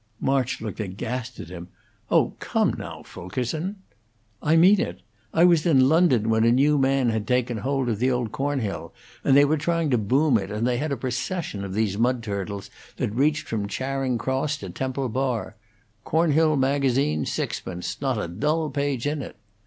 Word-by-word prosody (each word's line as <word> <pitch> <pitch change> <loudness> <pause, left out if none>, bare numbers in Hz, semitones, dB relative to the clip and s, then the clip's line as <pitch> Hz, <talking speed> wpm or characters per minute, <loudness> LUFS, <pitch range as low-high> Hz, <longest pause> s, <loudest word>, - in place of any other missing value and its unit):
March 135 -2 0
looked 110 -2 -5
aghast 115 +5 -4
at - - -8
him. 85 -1 -8 0.4
"Oh, - - +3
come, - - +1
now, - - -8
Fulkerson!" 130 - -4 0.7
"I 155 +2 +3
mean 185 +5 +6
it. 90 - -3 0.3
I 165 - +3
was 170 -3 +5
in 135 -6 +5
London 155 -9 +4
when 110 0 +3
a 115 - +5
new 140 +4 +4
man 135 -2 +2
had 110 -1 -2
taken 125 -1 +1
hold 135 +2 -1
of 110 -3 -1
the 130 +2 +2
old 125 -4 -1
Cornhill, 135 -7 -3 0.3
and 135 - +5
they 145 - +7
were 155 +1 +1
trying 165 -1 0
to 125 - +3
boom 130 +4 +3
it, 95 0 -6
and 105 +2 -2
they 125 -1 +1
had 155 +1 -2
a 140 - -1
procession 125 - -3
of 95 -1 -5
these 105 -2 0
mudturtles 105 -5 -2 0.3
that 105 - -2
reached 150 +5 +1
from 105 -3 -2
Charing 130 +2 -2
Cross 130 +6 -1
to - - -7
Temple 130 0 -2
Bar. 125 -4 -2 0.5
'Cornhill 160 -1 +3
Magazine'. 135 - +1
Sixpence. 90 +3 -4
Not 135 -4 0
a 105 - -2
dull 150 - -1
page 140 -3 -1
in 145 0 -1
it.' - - -8
130 Hz, 180 wpm, -24 LUFS, 110-145 Hz, 0.7 s, they